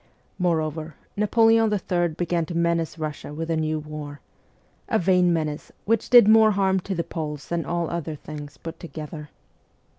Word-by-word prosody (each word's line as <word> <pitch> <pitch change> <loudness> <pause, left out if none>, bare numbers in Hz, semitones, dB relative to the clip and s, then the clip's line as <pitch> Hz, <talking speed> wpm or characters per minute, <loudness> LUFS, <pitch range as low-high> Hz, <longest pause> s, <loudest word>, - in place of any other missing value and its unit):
Moreover, 160 -3 -1 0.2
Napoleon 225 +1 +4
III. 180 -3 +1
began 170 0 -2
to 170 - -3
menace 170 -1 0
Russia 155 -2 -5
with 165 +1 -3
a - - +2
new 155 0 0
war 150 -1 -7 0.7
a - - +3
vain 180 0 +3
menace, 155 -3 -2
which 225 0 +1
did 240 -4 +8
more 220 0 +7
harm 195 -2 +2
to 190 +1 -4
the 170 - -1
Poles 150 -5 -6
than 170 -3 -1
all 170 -1 -1
other 165 -2 -4
things 145 0 -9
put 165 0 -8
together. 155 -2 -8
165 Hz, 160 wpm, -24 LUFS, 155-185 Hz, 0.7 s, did